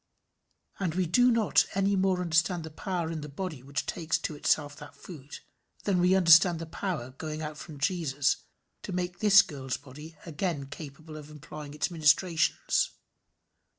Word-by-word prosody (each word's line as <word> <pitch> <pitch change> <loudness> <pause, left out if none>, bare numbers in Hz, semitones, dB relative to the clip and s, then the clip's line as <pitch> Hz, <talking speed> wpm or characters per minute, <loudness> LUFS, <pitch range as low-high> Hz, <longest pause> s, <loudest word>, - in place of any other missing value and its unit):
And 175 -4 -2
we 185 -1 +1
do 245 +9 +4
not 230 -4 +3
any 195 +1 +2
more 190 -1 +1
understand 170 0 +1
the 160 - -8
power 170 0 -3
in 160 -2 -4
the 150 - -7
body 155 -2 -5
which 140 +3 -4
takes 165 -2 -1
to - - -4
itself 145 0 0
that 150 - -12
food, 145 -6 -10 0.5
than 195 -3 +1
we 180 +2 +4
understand 170 -1 +6
the 165 - -6
power 160 -7 -4
going 155 +3 -6
out 150 0 -5
from 150 0 -10
Jesus 145 -3 0 0.4
to - - -7
make 180 0 -3
this 210 -2 +7
girl's 135 -5 -5
body 150 +4 -12 0.5
capable 155 +1 -9
of 150 - -9
again 150 - -13
employing 150 0 -9
its 150 - -1
ministrations. 160 +1 +2
160 Hz, 165 wpm, -28 LUFS, 150-180 Hz, 0.5 s, this